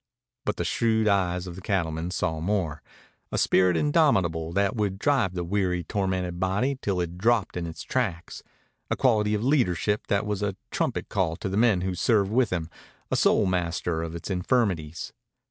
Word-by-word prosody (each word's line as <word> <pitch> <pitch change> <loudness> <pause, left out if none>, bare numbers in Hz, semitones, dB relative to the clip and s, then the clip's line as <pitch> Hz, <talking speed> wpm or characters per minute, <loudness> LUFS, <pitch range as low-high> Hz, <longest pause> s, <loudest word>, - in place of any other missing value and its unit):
But - - 0
the - - -3
shrewd 110 -1 +1
eyes 90 -3 +1
of 90 -2 -7
the 95 - -9
cattleman 85 -3 -1
saw 80 -3 -1
more 85 -5 -1 0.5
a - - -1
spirit 90 -2 +3
indomitable 80 +2 +2
that 100 +5 +1
would 100 -3 -1
drive 120 -6 +1
the 90 - -2
weary, 90 -1 0
tormented 95 -4 -2
body 110 +9 0
till 95 -3 -1
it 85 +1 -5
dropped 115 -1 +2
in 85 -1 -3
its 80 +1 -7
tracks, 95 -10 -2 0.5
a - - +1
quality 105 -5 +2
of 105 - -2
leadership 105 - +1
that 100 +1 +1
was 105 -1 -2
a 100 -2 -1 0.2
trumpet - - -1
call 90 -5 0
to 95 - -4
the 95 - -3
men 110 -4 +3
who 95 0 -1
served 100 +1 +2
with 120 -1 +3
him, 85 -3 -2 0.4
a - - +2
soul - - +3
master 85 -2 -1
of 85 0 -5
its 85 +4 -6
infirmities. 90 - -1
95 Hz, 180 wpm, -26 LUFS, 85-105 Hz, 0.5 s, spirit